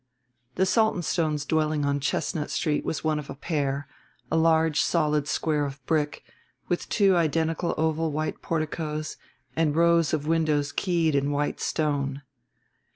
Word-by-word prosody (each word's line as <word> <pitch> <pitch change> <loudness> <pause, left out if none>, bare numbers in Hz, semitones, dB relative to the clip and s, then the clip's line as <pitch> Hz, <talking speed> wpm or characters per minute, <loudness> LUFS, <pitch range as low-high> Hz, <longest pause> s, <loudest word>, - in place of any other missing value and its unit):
The 190 - +3
Saltonstones' 170 -8 +1
dwelling 155 -2 +1
on 140 0 +1
Chestnut 150 +2 -1
Street 155 -6 0
was 155 - -3
one 155 -1 +1
of 145 - -9
a - - -6
pair 140 -2 -2 0.4
a - - +2
large 160 -1 +3
solid 150 -3 +1
square 150 -1 0
of 140 -2 -6
brick 150 -1 0 0.4
with 175 - -2
two 195 -3 +4
identical 165 +1 +1
oval 160 0 0
white 155 +1 -3
porticoes 155 -1 -3 0.4
and 155 -2 +1
rows 170 -1 +4
of 150 -2 -1
windows 155 -3 +1
keyed 170 -4 +1
in 140 0 +1
white 145 0 -1
stone. 145 -3 -1
155 Hz, 145 wpm, -26 LUFS, 145-165 Hz, 0.4 s, two